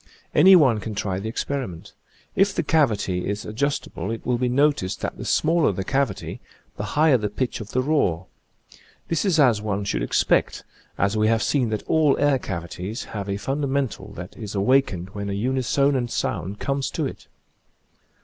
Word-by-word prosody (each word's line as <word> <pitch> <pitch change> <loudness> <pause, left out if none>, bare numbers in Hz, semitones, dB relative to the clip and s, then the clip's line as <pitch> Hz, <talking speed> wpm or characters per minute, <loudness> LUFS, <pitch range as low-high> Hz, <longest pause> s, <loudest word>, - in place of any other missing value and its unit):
Any 190 +6 +8
one 130 -10 +5
can 110 0 -6
try 95 -3 -2
the 110 +3 -4
experiment. 105 -7 -4 0.4
If 195 0 +3
the 170 - 0
cavity 110 - +1
is 100 +1 -3
adjustable 110 - -2
it 115 0 -5
will 125 -1 0
be 125 0 +1
noticed 140 -7 +1
that - - -3
the - - -7
smaller 160 -4 +2
the 95 0 -3
cavity 135 -3 -2 0.3
the 100 - -4
higher 150 -5 +5
the 105 -1 -2
pitch 120 +3 -3
of 105 - -8
the 130 - 0
roar. 95 - +1 0.8
This 165 +1 0
is 175 -5 +2
as 120 -7 +4
one 105 -1 -2
should - - -1
expect, - - +1 0.3
as 100 +2 +1
we 110 0 +2
have 115 0 +2
seen 130 -6 +1
that 110 -1 -2
all 155 -3 +3
air 145 -2 +3
cavities 90 +3 -5
have 100 -2 -4
a 100 - -1
fundamental 135 +2 -2
that 90 +1 -9
is 105 -3 -7
awakened 100 -4 +1
when 100 0 -5
a - - -2
unisonant 130 +3 +1
sound 95 -2 -2
comes 140 +2 -2
to - - -2
it. - - -7
115 Hz, 180 wpm, -23 LUFS, 100-140 Hz, 0.8 s, Any